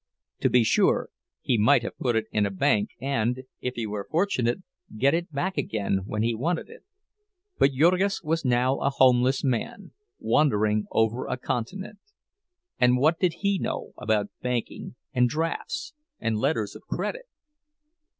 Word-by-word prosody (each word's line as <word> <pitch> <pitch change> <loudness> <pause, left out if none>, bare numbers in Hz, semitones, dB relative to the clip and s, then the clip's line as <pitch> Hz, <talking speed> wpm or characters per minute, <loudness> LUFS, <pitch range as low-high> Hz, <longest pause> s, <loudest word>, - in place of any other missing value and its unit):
To - - +2
be 125 -1 +4
sure 110 - +2 0.3
he 120 -4 +1
might 110 +3 +5
have - - -5
put 120 -3 0
it 110 -1 +1
in 105 -1 +2
a - - -2
bank, 100 +2 +1
and, 125 -1 -1 0.2
if 125 0 -4
he 115 - -3
were 105 -1 -5
fortunate, 160 -5 0 0.3
get 135 +5 +3
it 170 0 -1
back 175 +4 -2
again 105 -7 -1
when 105 0 -1
he 115 +1 +1
wanted 160 +9 -2
it. - - -14 0.8
But 135 0 +4
Jurgis 180 +8 +2
was 160 +1 -1
now 125 +1 +2
a - - +1
homeless 130 -1 +3
man, 135 - -2 0.3
wandering 105 -7 +2
over 110 +3 0
a - - -2
continent; 190 - -4 0.8
and 125 0 +4
what 155 +6 +3
did 180 -3 +2
he 200 -1 +1
know - - -4
about 105 -2 0
banking 125 -2 -3 0.2
and 125 -1 +3
drafts 165 - -3 0.3
and 115 - -1
letters 110 -3 -1
of - - -10
credit? - - -3
125 Hz, 160 wpm, -26 LUFS, 110-160 Hz, 0.8 s, might